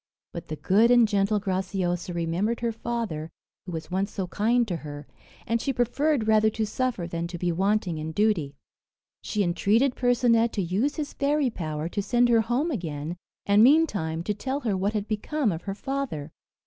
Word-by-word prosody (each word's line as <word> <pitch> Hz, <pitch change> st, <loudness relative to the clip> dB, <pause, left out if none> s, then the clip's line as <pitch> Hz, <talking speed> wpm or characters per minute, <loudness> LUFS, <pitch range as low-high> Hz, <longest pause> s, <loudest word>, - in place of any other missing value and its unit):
But 170 Hz, -, -7 dB
the 155 Hz, -, -4 dB
good 210 Hz, +9 st, +3 dB
and 240 Hz, -2 st, +6 dB
gentle 205 Hz, 0 st, +1 dB
Graciosa 185 Hz, -2 st, -2 dB
remembered 175 Hz, +7 st, -1 dB
her 235 Hz, -1 st, 0 dB
father 225 Hz, -9 st, -4 dB, 0.4 s
who -, -, -5 dB
was 160 Hz, 0 st, -6 dB
once 195 Hz, +2 st, -1 dB
so 190 Hz, -, -3 dB
kind 230 Hz, +6 st, +1 dB
to 175 Hz, -4 st, -2 dB
her, 145 Hz, -2 st, -8 dB, 0.4 s
and 230 Hz, 0 st, 0 dB
she 275 Hz, -, 0 dB
preferred 245 Hz, +1 st, +1 dB
rather 220 Hz, 0 st, +4 dB
to 220 Hz, 0 st, -2 dB
suffer 230 Hz, -3 st, -2 dB
than 170 Hz, 0 st, -3 dB
to 175 Hz, 0 st, -6 dB
be 175 Hz, +1 st, 0 dB
wanting 190 Hz, -2 st, 0 dB
in 155 Hz, +1 st, -4 dB
duty. 175 Hz, -7 st, +1 dB, 0.7 s
She 210 Hz, -2 st, -1 dB
entreated 210 Hz, +9 st, +2 dB
Percinet 240 Hz, -2 st, +3 dB
to 205 Hz, -, -1 dB
use 205 Hz, -, 0 dB
his 300 Hz, -2 st, -4 dB
fairy 280 Hz, -2 st, +1 dB
power 155 Hz, -4 st, -4 dB
to 205 Hz, -, -2 dB
send 240 Hz, +4 st, +2 dB
her 230 Hz, -1 st, +5 dB
home 245 Hz, +9 st, 0 dB
again, 165 Hz, -, -4 dB, 0.3 s
and 200 Hz, +1 st, +5 dB
meantime 205 Hz, -, +3 dB
to 210 Hz, -, -1 dB
tell 265 Hz, +7 st, -3 dB
her 220 Hz, -6 st, 0 dB
what 195 Hz, +3 st, 0 dB
had 210 Hz, -1 st, -2 dB
become 230 Hz, +3 st, -1 dB
of 165 Hz, -1 st, -4 dB
her 195 Hz, -1 st, -3 dB
father. 255 Hz, -, -4 dB
210 Hz, 185 wpm, -26 LUFS, 175-240 Hz, 0.7 s, and